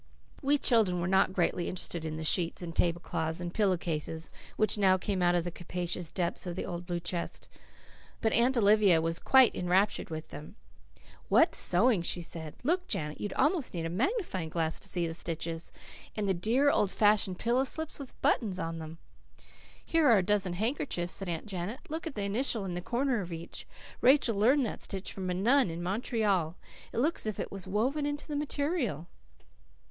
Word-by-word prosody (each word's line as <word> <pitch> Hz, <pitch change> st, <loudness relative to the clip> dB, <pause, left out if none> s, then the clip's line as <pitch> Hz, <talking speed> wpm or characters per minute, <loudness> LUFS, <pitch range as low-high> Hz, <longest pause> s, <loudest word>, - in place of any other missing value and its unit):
We 285 Hz, +2 st, +3 dB
children 220 Hz, -10 st, +3 dB
were 175 Hz, -, -1 dB
not 190 Hz, 0 st, +3 dB
greatly 175 Hz, -1 st, 0 dB
interested 170 Hz, -2 st, -3 dB
in 155 Hz, -1 st, -3 dB
the 160 Hz, -, -5 dB
sheets 170 Hz, +3 st, +1 dB
and 165 Hz, -1 st, -6 dB
tablecloths 165 Hz, -1 st, -1 dB
and 175 Hz, 0 st, -5 dB
pillow 195 Hz, -4 st, +2 dB
cases 160 Hz, -1 st, -3 dB, 0.3 s
which 215 Hz, -, +3 dB
now 190 Hz, -3 st, +4 dB
came 190 Hz, 0 st, -2 dB
out 175 Hz, 0 st, +3 dB
of 175 Hz, -, +1 dB
the 175 Hz, -, -4 dB
capacious 175 Hz, 0 st, -3 dB
depths 180 Hz, 0 st, -2 dB
of 175 Hz, -, -4 dB
the -, -, -3 dB
old 175 Hz, 0 st, -6 dB
blue 175 Hz, -1 st, -2 dB
chest. 170 Hz, 0 st, -4 dB, 0.7 s
But 220 Hz, -, +1 dB
Aunt 250 Hz, +2 st, +3 dB
Olivia 205 Hz, -5 st, +5 dB
was 165 Hz, +1 st, 0 dB
quite 265 Hz, -2 st, +6 dB
enraptured 185 Hz, +3 st, +1 dB
over 160 Hz, -, -2 dB
them. 150 Hz, -1 st, -11 dB, 0.7 s
"What -, -, +5 dB
sewing!" 210 Hz, +2 st, +3 dB
she 175 Hz, +1 st, 0 dB
said. 160 Hz, -2 st, -7 dB
"Look, 360 Hz, +6 st, 0 dB
Janet, 150 Hz, -1 st, -3 dB
you'd 205 Hz, -, -3 dB
almost 300 Hz, -, +1 dB
need 165 Hz, -1 st, -3 dB
a 165 Hz, -, -3 dB
magnifying 215 Hz, -, -1 dB
glass 160 Hz, 0 st, -1 dB
to 195 Hz, -, -6 dB
see 175 Hz, -3 st, -1 dB
the 165 Hz, -, -3 dB
stitches. 165 Hz, 0 st, -4 dB, 0.4 s
And 210 Hz, -, -1 dB
the 195 Hz, -, +2 dB
dear, 235 Hz, +11 st, +2 dB
old 205 Hz, -, +2 dB
fashioned 205 Hz, -3 st, +2 dB
pillow 245 Hz, +5 st, +1 dB
slips 315 Hz, +3 st, -1 dB
with 275 Hz, -3 st, -10 dB
buttons 205 Hz, -7 st, +2 dB
on 165 Hz, -2 st, -4 dB
them!" 160 Hz, +1 st, -8 dB, 0.9 s
"Here 325 Hz, -2 st, +3 dB
are 230 Hz, -, +7 dB
a 190 Hz, -, +2 dB
dozen 195 Hz, -2 st, +1 dB
handkerchiefs," 205 Hz, -3 st, -2 dB
said 195 Hz, -2 st, -3 dB
Aunt 165 Hz, -2 st, -3 dB
Janet. 200 Hz, +4 st, -5 dB
"Look 320 Hz, +1 st, -4 dB
at 310 Hz, -, -6 dB
the 205 Hz, -, -2 dB
initial 215 Hz, +1 st, 0 dB
in 180 Hz, -, -4 dB
the 175 Hz, -, -3 dB
corner 245 Hz, +3 st, 0 dB
of 180 Hz, -2 st, -7 dB
each. 165 Hz, +1 st, -8 dB, 0.3 s
Rachel 255 Hz, -4 st, +4 dB
learned 250 Hz, +7 st, +3 dB
that 220 Hz, -, -5 dB
stitch 195 Hz, -1 st, -4 dB
from 185 Hz, -2 st, -4 dB
a 180 Hz, -, -1 dB
nun 245 Hz, +5 st, +3 dB
in 165 Hz, +1 st, -5 dB
Montreal. 195 Hz, -4 st, 0 dB, 0.4 s
It -, -, -7 dB
looks 300 Hz, +8 st, +1 dB
as -, -, -4 dB
if 215 Hz, -, -3 dB
it -, -, -4 dB
was 195 Hz, -1 st, -6 dB
woven 260 Hz, +10 st, 0 dB
into 290 Hz, 0 st, -4 dB
the 300 Hz, -, -4 dB
material." 285 Hz, -, -2 dB
190 Hz, 195 wpm, -30 LUFS, 175-235 Hz, 0.9 s, are